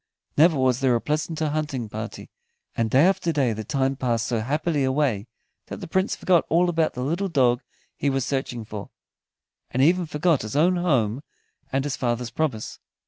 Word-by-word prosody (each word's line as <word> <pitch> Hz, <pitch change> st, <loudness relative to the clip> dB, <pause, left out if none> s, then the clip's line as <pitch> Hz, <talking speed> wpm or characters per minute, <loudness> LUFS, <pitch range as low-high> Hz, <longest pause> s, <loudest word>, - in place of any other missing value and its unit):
Never 160 Hz, +1 st, +5 dB
was 130 Hz, -2 st, +2 dB
there 130 Hz, -2 st, +3 dB
a -, -, +2 dB
pleasanter 155 Hz, +3 st, -1 dB
hunting 145 Hz, -6 st, -2 dB
party, 110 Hz, +1 st, -7 dB, 0.4 s
and 115 Hz, -1 st, 0 dB
day 135 Hz, +8 st, +5 dB
after 190 Hz, -3 st, +2 dB
day 135 Hz, -7 st, +1 dB
the 110 Hz, +1 st, -5 dB
time 135 Hz, +4 st, 0 dB
passed 120 Hz, -4 st, 0 dB
so 115 Hz, -1 st, -1 dB
happily 145 Hz, +5 st, 0 dB
away 130 Hz, -6 st, 0 dB, 0.4 s
that -, -, -6 dB
the -, -, -7 dB
Prince 190 Hz, +4 st, 0 dB
forgot 175 Hz, -3 st, +3 dB
all 175 Hz, +2 st, +3 dB
about 165 Hz, -2 st, +1 dB
the 125 Hz, -, -3 dB
little 175 Hz, +8 st, -1 dB
dog 125 Hz, -6 st, +3 dB, 0.3 s
he 145 Hz, -, 0 dB
was 135 Hz, -2 st, 0 dB
searching 125 Hz, -4 st, -3 dB
for, 105 Hz, -1 st, -7 dB, 0.8 s
and 130 Hz, +2 st, +1 dB
even 175 Hz, +3 st, +3 dB
forgot 155 Hz, 0 st, +1 dB
his 110 Hz, +4 st, -6 dB
own 175 Hz, +5 st, +3 dB
home 135 Hz, -9 st, +1 dB, 0.5 s
and 135 Hz, 0 st, 0 dB
his 145 Hz, -1 st, -3 dB
father's 120 Hz, -1 st, -1 dB
promise. 140 Hz, -9 st, -2 dB
135 Hz, 185 wpm, -24 LUFS, 120-160 Hz, 0.8 s, Never